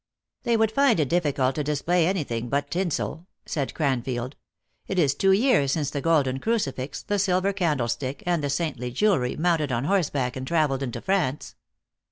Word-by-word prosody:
" - - -56
They 235 -1 +3
would 220 -1 +2
find 270 -5 +3
it 145 -4 +1
difficult 145 -6 +1
to 150 - -2
display 160 +4 +1
any 185 -3 0
thing 120 -2 -4
but 140 +1 -1
tinsel," 170 -2 -2 0.2
said 140 -5 -3
Cranfield. 130 -3 -1 0.3
" - - -45
It 190 - -3
is 145 -6 +3
two 195 +5 +2
years 190 - +3
since 150 -3 -1
the 145 - -3
golden 140 -5 +2
crucifix, 145 - -2
the 205 0 -1
silver 190 0 +1
candlestick, 135 -7 -1
arid 175 -2 +1
the 145 - -2
saintly 140 -5 -2
jewelry, 130 - +1
mounted 160 -3 +1
on 120 0 0
horseback 145 -7 0
and 130 0 -5
traveled 150 -5 +1
into 125 -4 -4
France." 175 -8 -1
150 Hz, 185 wpm, -25 LUFS, 135-180 Hz, 0.3 s, They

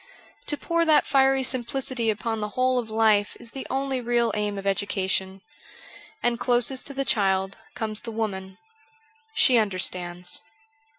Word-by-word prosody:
To 295 - +1
pour 335 +2 +1
that 310 -2 +5
fiery 270 -1 +3
simplicity 255 -1 -1
upon 220 +1 -1
the 210 0 -3
whole 255 0 +3
of 230 -2 -5
life 215 -2 +2
is 230 - -2
the 270 - -6
only 270 -1 -1
real 235 -1 +1
aim 210 -1 -1
of 195 - -6
education; 190 -1 -1 0.8
and 240 -1 +1
closest 245 +1 +2
to 280 - -6
the 275 0 -1
child 195 -4 +1 0.2
comes 215 -1 -3
the 235 - -7
woman 190 -4 -4 0.4
— 445 0 -33
she 250 -3 +5
understands. 180 -2 -1
230 Hz, 155 wpm, -25 LUFS, 200-265 Hz, 0.8 s, that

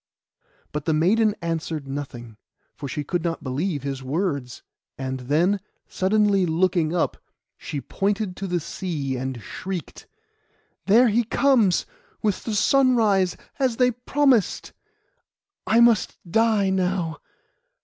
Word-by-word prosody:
But 150 - -4
the 160 -2 +2
maiden 210 +7 +3
answered 160 -3 -3
nothing, 120 -5 -7 0.4
for 145 - -7
she 150 - -3
could 170 +3 -2
not 165 -1 -2
believe 145 +3 -2
his 135 -1 -4
words. 140 -3 -3 0.3
And 130 0 -4
then, 160 +10 +1 0.3
suddenly 200 0 +2
looking 170 -1 +1
up, 175 - 0 0.4
she 145 - -6
pointed 200 +1 -2
to 195 - -4
the 175 -1 0
sea, 150 -5 -4
and 130 -1 -4
shrieked— 185 -5 -6 0.8
'There 235 +5 +6
he 230 +3 +2
comes, 230 -5 +3 0.4
with 210 -3 -1
the 225 - -2
sunrise, 220 -7 +3 0.2
as 255 -4 +1
they 250 -1 +4
promised. 250 -1 +1 0.9
I 225 - +4
must 235 -6 +3
die 215 0 +2
now. 180 -3 -1
185 Hz, 125 wpm, -24 LUFS, 150-215 Hz, 0.9 s, There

